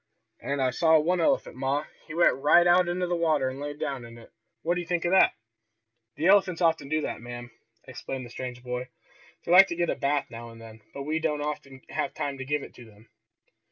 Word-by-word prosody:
And 140 -1 -2
I 130 - +2
saw 160 +4 +4
one 170 +3 +1
elephant, 160 - +1
ma, 135 +3 -1 0.2
he 155 - -8
went 170 - +5
right 150 +6 +4
out 175 +1 +5
in 175 - -2
the 180 -1 -1
water 155 -6 +1
and 130 +1 -8
laid 145 0 -5
down 135 -4 -4
in 115 0 -11
it. 115 - -15 0.3
What 170 - +1
do 180 - -2
you 175 - -9
think 175 -1 -1
of 175 - +1
that!" 190 - +5 0.8
"The 160 - -3
elephants 190 -2 +4
often 165 -5 +1
do 155 +1 +1
that, - - -4
ma'am," 120 0 -8 0.3
explained 130 0 -7
the 120 - -12
strange 125 -1 -7
boy. 125 0 -4 0.6
"They 170 - -2
like 190 +2 +9
to 170 - -4
get 175 0 0
a - - -2
bath 140 0 -1
now 115 0 -8
and 115 0 -13
then, 110 -1 -13
but 140 - -7
we 155 +3 -1
don't 150 -2 -1
often 140 -3 -6
have - - -3
time 140 -1 -3
to 135 - -5
give 145 +1 -1
it - - -11
to 120 - -12
them." 110 0 -19
145 Hz, 235 wpm, -27 LUFS, 125-170 Hz, 0.8 s, like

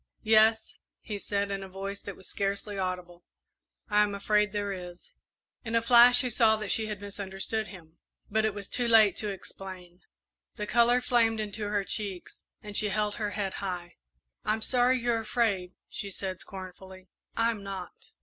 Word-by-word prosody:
"Yes," 220 0 +3 0.2
he 210 -2 -6
said, 200 0 -2
in 195 0 -3
a 195 - -8
voice 195 +1 -6
that 200 - -7
was 190 - -13
scarcely 200 +1 -2
audible; 180 -2 -4 0.6
"I 210 - +3
am 205 -1 +1
afraid 210 +1 +2
there 205 -1 -2
is." 180 -1 -10 0.5
In 230 -1 -3
a 230 - +4
flash 245 +1 +8
he 250 - 0
saw 220 -1 +4
that 215 -2 -3
she 220 -1 +2
had 210 -2 -5
misunderstood 200 +2 -3
him, 170 -4 -14 0.3
but 220 +1 +1
it 215 -2 0
was 200 -2 -6
too 245 -1 -1
late 220 -3 +6
to 210 - -3
explain. 185 -2 -9 0.5
The 210 - -4
colour 240 +3 +4
flamed 230 -3 +2
into 210 0 -3
her 205 -1 0
cheeks, 195 -2 -4 0.2
and 210 -1 -7
she 210 - +4
held 210 +1 0
her 210 -3 -2
head 195 -2 -2
high. 180 -3 -5 0.5
"I'm 215 +1 +1
sorry 250 +1 +3
you're 235 -1 +1
afraid," 215 -5 0
she 200 - -6
said, 190 -1 -5
scornfully, 185 -1 -9 0.3
"I'm 230 -2 +1
not!" 195 -2 -8
205 Hz, 175 wpm, -29 LUFS, 190-220 Hz, 0.6 s, flash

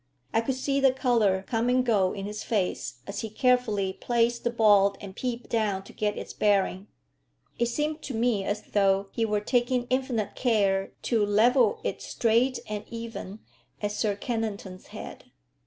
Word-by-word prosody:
I 225 - +3
could 255 +3 -1
see 275 +1 0
the 270 -1 +5
colour 230 -7 +2
come 230 +2 0
and 255 0 +3
go 200 -6 +3
in 195 -1 -5
his 210 +1 -5
face 180 - -2
as 200 0 -5
he 220 - -4
carefully 215 -5 +1
placed 235 +1 0
the 240 - +1
ball 205 -4 +4
and 190 -2 -9
peeped 245 -1 -4
down 210 -4 0
to - - -14
get 210 -1 -1
its - - -6
bearing. 200 -1 +1 0.7
It 235 - +2
seemed 300 +6 -2
to 265 - -5
me 225 -3 +1
as 210 +2 -2
though 195 -1 +2
he 225 - 0
were 210 -1 0
taking 245 +2 +1
infinite 255 -5 0
care 200 -5 +1
to 230 -4 +2
level 245 - +3
it - - -3
straight 240 +3 +1
and 210 -1 -4
even 230 -3 -7 0.4
at 205 -1 -2
Sir 210 -1 0
Kennington's 205 -4 -4
head. - - -9
220 Hz, 170 wpm, -27 LUFS, 200-245 Hz, 0.7 s, the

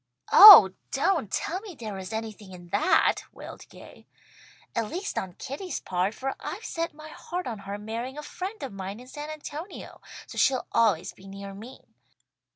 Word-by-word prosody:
"Oh 360 - +12 0.2
don't 300 - 0
tell 370 +3 -2
me 400 -5 -10
there 215 -6 -7
is 185 +2 -8
anything 220 -3 -7
in 175 -1 -13
that," 205 - +3
wailed - - -12
Gay, - - -15 0.7
"at 230 -2 -1
least 385 +4 -5
on 185 -2 -4
Kitty's 285 - -6
part, 185 +4 -2
for 270 0 -3
I've 420 +6 -7
set 330 -2 -4
my 310 0 -11
heart 355 +3 -6
on 225 -4 -5
her 200 +1 -6
marrying 230 +6 -6
a 300 - -6
friend 375 +4 -7
of 265 - -6
mine 195 +2 -7
in 250 - -12
San 295 +4 -8
Antonio, 310 +4 -9 0.2
so - - -7
she'll 260 -2 +2
always 220 -8 +1
be 195 - -16
near 195 0 -9
me. 225 +6 -11
240 Hz, 175 wpm, -26 LUFS, 200-310 Hz, 0.7 s, Oh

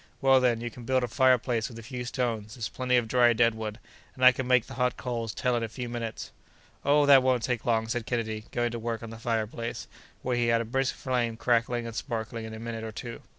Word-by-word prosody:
Well, 135 -1 +5
then, 120 -3 +2
you 120 0 -4
can 120 - -11
build 130 +2 +1
a - - 0
fireplace 125 -2 +2
with 115 - -11
a 115 - -9
few 125 +1 -6
stones; 115 -4 -2
there's 110 -4 -4
plenty 125 -1 +1
of 120 -2 +1
dry 120 0 +4
dead 115 0 +3
wood, 110 -1 -5 0.4
and 130 - +2
I 125 - +11
can 130 0 -4
make 125 -2 +4
the - - -10
hot 125 -1 0
coals 115 -3 -3
tell 125 +4 0
in 120 - 0
a 115 - -1
few 125 +2 -5
minutes." 120 -2 -5 0.5
"Oh! 145 +1 +4
that 140 -2 +8
won't 130 -2 +2
take 125 -3 -2
long," 110 -1 +2
said 120 0 -3
Kennedy, 110 -3 -2
going 120 0 0
to 120 - -4
work 115 0 -3
on 115 - -7
the 115 - -9
fireplace, 115 -1 -3 0.4
where 125 -1 0
he 120 -1 +2
had 115 0 +3
a 115 - -2
brisk 130 +3 0
flame 120 -3 -1
crackling 120 0 +1
and 115 -1 -6
sparkling 115 -2 -4
in 110 - -7
a - - -8
minute 115 -1 -5
or 110 - -5
two. 115 +2 -7
120 Hz, 250 wpm, -28 LUFS, 115-125 Hz, 0.5 s, I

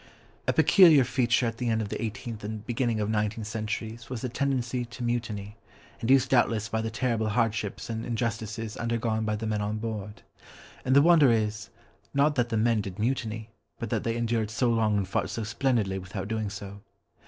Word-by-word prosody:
A - - +3
peculiar 165 -8 +7
feature 125 -1 +2
of 115 0 -2
the 120 -1 -1
end 110 -1 +1
of 105 -2 -3
the - - -4
eighteenth 115 -1 -5
and 105 0 -5
beginning 120 -2 0
of 105 - 0
nineteenth 105 0 -1
centuries 110 +1 -4
was 125 -3 -4
the 125 - -2
tendency 130 -2 -1
to 120 +1 -8
mutiny, 110 -3 -3 0.4
induced 130 +2 +3
doubtless 115 -4 +3
by 110 +1 -1
the 115 - -2
terrible 115 -2 0
hardships 105 -2 -1
and 115 -1 -4
injustices 115 -2 -3
undergone 115 -1 -1
by 105 0 0
the 110 +1 -4
men 105 -1 -1
on 105 +1 -2
board. 105 -2 -5 0.6
And 130 +1 +2
the 140 - +7
wonder 160 -6 +6
is, 110 -1 -1 0.5
not 145 +2 +4
that 120 -3 0
the 115 - 0
men 115 0 +2
did 95 -2 -7
mutiny, 110 -1 -2 0.3
but 115 - -5
that - - 0
they 115 0 -1
endured 115 -2 0
so 120 +2 +1
long 110 -2 +2
and 100 -2 -1
fought 95 - -1
so 115 - -3
splendidly 115 -4 0
without 95 +1 -6
doing 110 -1 -2
so. 100 0 -8
115 Hz, 195 wpm, -28 LUFS, 105-120 Hz, 0.6 s, peculiar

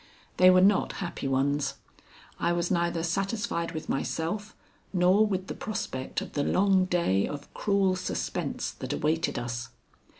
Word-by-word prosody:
They 185 0 +8
were 185 0 +6
not 195 +1 +4
happy 175 -7 -4
ones; 140 +2 +1 0.6
I 170 - +1
was 175 +1 -1
neither 170 -2 +1
satisfied 195 0 -1
with 155 - -5
myself 200 +9 -2 0.4
nor 190 +3 +4
with 190 -2 -2
the - - -5
prospect 130 -11 -4
of - - -8
the 145 - 0
long 190 +1 +3
day 170 - +1
of 145 -1 -8
cruel 195 -2 +2
suspense 185 - -3
that - - -5
awaited 160 +2 0
us. 120 0 -4
175 Hz, 145 wpm, -28 LUFS, 150-195 Hz, 0.6 s, They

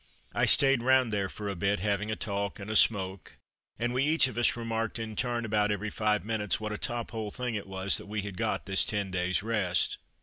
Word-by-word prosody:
I - - +2
stayed 135 -3 +5
round 130 -2 +3
there 100 -2 0
for 105 +1 -6
a 100 - -2
bit, 100 +3 0
having 100 +2 -1
a 110 - -1
talk 100 -1 -3
and 100 +2 -6
a - - -2
smoke, 95 -5 +2 0.4
and 120 +2 -1
we 130 +2 +1
each 155 -1 +4
of 125 - -7
us 120 0 +2
remarked 115 -1 -2
in 110 -1 -5
turn, 120 -1 -1
about 105 -1 +1
every 105 +1 -2
five 105 -1 0
minutes, 105 -4 -1
what 110 0 -4
a - - -3
top 120 -1 -3
hole 110 -2 -4
thing 125 +2 -4
it 105 -3 -4
was 95 0 +1
that - - -11
we 105 0 -3
had 100 -2 -6
got - - -2
this 95 -1 +3
ten 100 -4 -2
days' 90 0 0
rest. 105 -6 0
105 Hz, 235 wpm, -29 LUFS, 100-115 Hz, 0.4 s, stayed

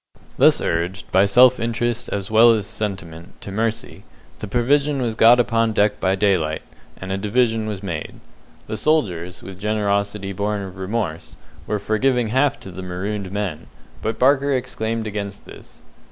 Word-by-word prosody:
Thus - - +5
urged, 85 +4 -2
by 95 +1 +4
self 125 +5 +6
interest, 115 0 -2
as 100 0 -4
well 115 +1 +7
as 105 -3 -1
sentiment, 95 -6 -6
to 100 - -7
mercy, 115 +2 -3 0.4
the 105 - -5
provision 140 +6 +1
was 120 -3 -1
got 115 +2 +6
upon 115 -1 +1
deck 105 0 +2
by 95 +1 +1
daylight, 90 -6 +1 0.3
and 95 0 -7
a 95 - -1
division 110 +1 +1
was 105 -2 -5
made. 85 -6 -4 0.5
The 110 - -4
soldiers, 95 - 0
with 95 0 -10
generosity 100 -1 -1
born 100 +1 -2
of 95 -1 -9
remorse, 95 -4 -4 0.3
were 105 - 0
for 110 +2 -2
giving 125 -3 +2
half 130 +4 +1
to 95 - -9
the 95 - -8
marooned 95 +2 -4
men, 95 -6 -4 0.3
but 110 0 -2
Barker 140 +1 +3
exclaimed 115 -3 -3
against 100 -1 -5
this. - - -15
105 Hz, 165 wpm, -21 LUFS, 95-115 Hz, 0.5 s, well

